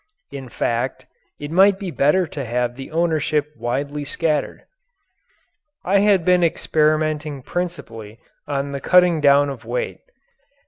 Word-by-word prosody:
In 135 Hz, -2 st, -8 dB
fact, 120 Hz, +2 st, -2 dB, 0.3 s
it 145 Hz, +1 st, -6 dB
might 190 Hz, +3 st, +5 dB
be 195 Hz, -3 st, -5 dB
better 160 Hz, +6 st, +2 dB
to 145 Hz, -3 st, -6 dB
have 120 Hz, 0 st, -2 dB
the 135 Hz, 0 st, -9 dB
ownership 155 Hz, -2 st, 0 dB
widely 140 Hz, +5 st, -3 dB
scattered. 150 Hz, +1 st, -2 dB, 1.2 s
I 195 Hz, +2 st, +3 dB
had 200 Hz, -4 st, +3 dB
been 180 Hz, -1 st, +4 dB
experimenting 155 Hz, -3 st, 0 dB
principally 115 Hz, -12 st, -6 dB, 0.3 s
upon 140 Hz, -1 st, -2 dB
the 140 Hz, -1 st, -5 dB
cutting 180 Hz, -2 st, +4 dB
down 145 Hz, 0 st, +4 dB
of 125 Hz, -4 st, -9 dB
weight. 120 Hz, +2 st, -4 dB
150 Hz, 130 wpm, -21 LUFS, 135-170 Hz, 1.2 s, might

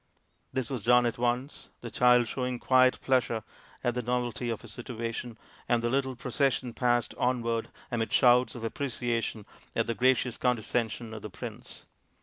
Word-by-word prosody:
This 130 Hz, 0 st, -2 dB
was 125 Hz, -6 st, -3 dB
done 125 Hz, +1 st, +5 dB
at 120 Hz, 0 st, -1 dB
once, 125 Hz, +4 st, -2 dB
the 120 Hz, -, -7 dB
child 125 Hz, +1 st, +5 dB
showing 125 Hz, 0 st, -2 dB
quiet 130 Hz, +1 st, +4 dB
pleasure 120 Hz, -4 st, +1 dB, 0.4 s
at 120 Hz, -, +1 dB
the 125 Hz, -, -1 dB
novelty 125 Hz, 0 st, -1 dB
of 115 Hz, 0 st, -3 dB
his 115 Hz, -2 st, -10 dB
situation, 115 Hz, -1 st, -5 dB, 0.3 s
and 120 Hz, -1 st, +2 dB
the 120 Hz, -, +1 dB
little 130 Hz, -1 st, 0 dB
procession 125 Hz, 0 st, 0 dB
passed 120 Hz, -1 st, +1 dB
onward 115 Hz, -2 st, 0 dB, 0.2 s
amid 115 Hz, -2 st, -1 dB
shouts 125 Hz, +1 st, +5 dB
of 120 Hz, -, -7 dB
apprecia 120 Hz, -1 st, -1 dB
tion 110 Hz, -2 st, -5 dB, 0.3 s
at -, -, +2 dB
the 115 Hz, -, -1 dB
gracious 125 Hz, 0 st, +2 dB
condescension 115 Hz, -2 st, -1 dB
of 110 Hz, -, -7 dB
the 105 Hz, -, -6 dB
prince. 90 Hz, -, -9 dB
120 Hz, 165 wpm, -29 LUFS, 115-125 Hz, 0.4 s, done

